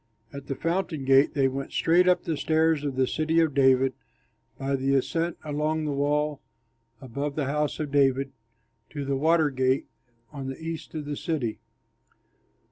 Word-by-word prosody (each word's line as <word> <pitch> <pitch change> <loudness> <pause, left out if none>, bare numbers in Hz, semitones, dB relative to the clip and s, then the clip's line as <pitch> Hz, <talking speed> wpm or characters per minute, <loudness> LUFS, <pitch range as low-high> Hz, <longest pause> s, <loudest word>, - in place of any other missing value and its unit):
At 140 -1 -8
the 135 - -3
Fountain 165 -4 -2
Gate 135 +2 +4
they 135 -2 +3
went 135 +1 -4
straight 175 +2 +3
up 180 -1 +3
the 165 - -2
stairs 160 0 +2
of 140 -3 -2
the 130 0 +2
City 160 +4 0
of 160 -3 +2
David 130 -1 +4 0.6
by 135 0 -1
the 135 +1 +1
ascent 165 +5 0
along 155 +1 -1
the 150 - -1
wall 145 +1 0 0.6
above 140 +2 -4
the 150 - -1
House 150 +3 -1
of 150 -2 -3
David 135 -1 +2 0.6
to 145 -2 -5
the 140 0 0
Water 160 +1 +3
Gate 130 0 +1 0.5
on 140 -3 -6
the 135 - -5
east 165 0 -6
of 150 -2 -4
the 145 0 -3
city. 145 - -2
145 Hz, 170 wpm, -26 LUFS, 135-155 Hz, 0.6 s, Gate